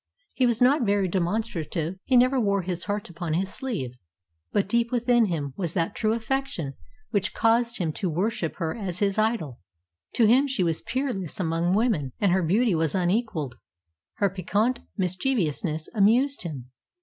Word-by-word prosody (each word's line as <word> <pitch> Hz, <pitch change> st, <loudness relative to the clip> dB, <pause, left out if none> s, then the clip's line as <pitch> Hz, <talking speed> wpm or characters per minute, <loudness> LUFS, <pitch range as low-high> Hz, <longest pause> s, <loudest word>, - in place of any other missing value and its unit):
He 255 Hz, -, +3 dB
was 235 Hz, +1 st, +2 dB
not 275 Hz, +4 st, +4 dB
very 200 Hz, -3 st, +2 dB
demonstrative. 175 Hz, -2 st, -2 dB
He 255 Hz, -, +4 dB
never 255 Hz, +1 st, +4 dB
wore 200 Hz, -3 st, +1 dB
his 175 Hz, -1 st, -3 dB
heart 205 Hz, +2 st, -2 dB
upon 165 Hz, -2 st, -3 dB
his 190 Hz, +2 st, -1 dB
sleeve, 210 Hz, -, -3 dB, 0.6 s
but 200 Hz, -, +1 dB
deep 235 Hz, +3 st, +1 dB
within 240 Hz, -1 st, +3 dB
him 145 Hz, -6 st, -3 dB
was 175 Hz, -4 st, -3 dB
that 165 Hz, -3 st, 0 dB
true 215 Hz, -1 st, +1 dB
affection 230 Hz, -, -2 dB, 0.4 s
which 200 Hz, -3 st, -1 dB
caused 235 Hz, +1 st, +2 dB
him 165 Hz, -5 st, -1 dB
to 185 Hz, -, -2 dB
worship 175 Hz, 0 st, -1 dB
her 165 Hz, -3 st, -2 dB
as 190 Hz, -6 st, -4 dB
his 200 Hz, +1 st, +1 dB
idol. 215 Hz, -, 0 dB, 0.5 s
To 230 Hz, -, +4 dB
him 255 Hz, +6 st, +5 dB
she 260 Hz, -9 st, 0 dB
was 165 Hz, -2 st, 0 dB
peerless 235 Hz, -, -3 dB
among 170 Hz, +1 st, +1 dB
women, 200 Hz, -, +1 dB
and 200 Hz, -3 st, +3 dB
her 190 Hz, +1 st, +3 dB
beauty 205 Hz, +6 st, +2 dB
was 160 Hz, -1 st, 0 dB
unequalled. 180 Hz, -, -1 dB, 0.6 s
Her 200 Hz, -2 st, +1 dB
piquant 205 Hz, +6 st, 0 dB, 0.2 s
mischievousness 180 Hz, -, -1 dB
amused 240 Hz, +7 st, +3 dB
him. 135 Hz, -8 st, -6 dB
195 Hz, 165 wpm, -26 LUFS, 170-235 Hz, 0.6 s, him